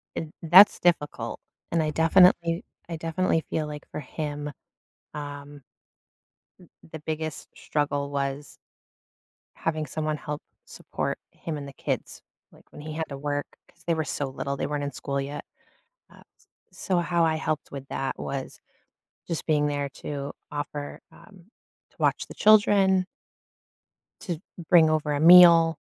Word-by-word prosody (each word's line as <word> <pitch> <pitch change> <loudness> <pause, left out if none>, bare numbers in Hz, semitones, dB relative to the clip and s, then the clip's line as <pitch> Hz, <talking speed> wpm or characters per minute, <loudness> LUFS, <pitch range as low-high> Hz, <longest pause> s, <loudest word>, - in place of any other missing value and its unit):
eh, - - -3 0.2
that's 180 +5 +8
difficult, 145 -9 0 0.3
and 165 -1 +2
I 155 - 0
definitely 170 +1 +4 0.3
I 165 - -4
definitely 165 +1 0
feel, 155 -1 -1
like, 150 0 -8
for - - -5
him, 150 0 -5 0.6
um, 145 -1 -8 1.0
m - - -17 0.2
the 160 - -7
biggest 155 0 -5
struggle 145 -1 -2
was 140 +1 -3 1.0
having 155 -1 -2
someone 155 +1 -3
help 150 0 -6 0.2
support - - -4
him 160 -2 -6
and 140 -1 -7
the 140 - -10
kids, - - -4 0.3
like, - - -20
when - - -11
he 155 0 -7
had 160 0 -3
to 140 - -6
work- 145 0 -4
'cause 170 - -25
they 170 - +1
were 160 - -1
so 145 - -3
little, 140 +1 -4
they - - -2
weren't 145 -1 -2
in 140 - -3
school 140 +1 -3
yet- 140 +2 -5 0.7
uh, - - -17 0.2
s - - -29 0.3
so 185 -2 -1
how 170 0 +1
I 160 -1 +2
helped 155 -1 -3
with 135 -1 -8
that 135 - -3
was 135 -1 -5 0.7
just 165 -3 -4
being 150 -2 +2
there 145 -1 -2
to 140 0 -6 0.2
offer, 145 0 -5
um, 190 -5 -18 0.4
to - - -31
watch - - +1
the - - -11
children 200 -3 +5 1.2
to 175 -6 -4 0.3
bring 165 -3 +7
over 155 -1 0
a 145 - -1
meal, 165 -1 +8
155 Hz, 155 wpm, -26 LUFS, 145-165 Hz, 1.2 s, that's